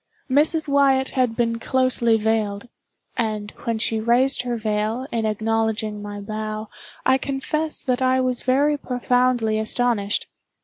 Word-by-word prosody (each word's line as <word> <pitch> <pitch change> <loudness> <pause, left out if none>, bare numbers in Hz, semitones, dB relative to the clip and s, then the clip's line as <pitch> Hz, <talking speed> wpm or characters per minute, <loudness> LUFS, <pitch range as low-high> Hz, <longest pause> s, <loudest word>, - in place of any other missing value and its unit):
Mrs. 310 +3 +3
Wyatt 275 -2 +3
had 250 -4 0
been 230 -1 0
closely 245 -2 +2
veiled; 215 -1 -1 0.5
and 215 -3 -2
when 230 -1 0
she 220 0 0
raised 245 +5 +2
her 245 -1 -3
veil, 215 +3 -1
in 225 -2 -1
acknowledging 220 -1 -1
my 205 0 -6
bow, 215 +1 -5 0.4
I 260 0 +4
confess 305 +4 -2
that 255 -1 -1
I 260 0 +3
was 255 -1 0
very 285 +3 +2
profoundly 245 -3 +1
astonished. 220 -2 +1
235 Hz, 135 wpm, -22 LUFS, 215-260 Hz, 0.5 s, I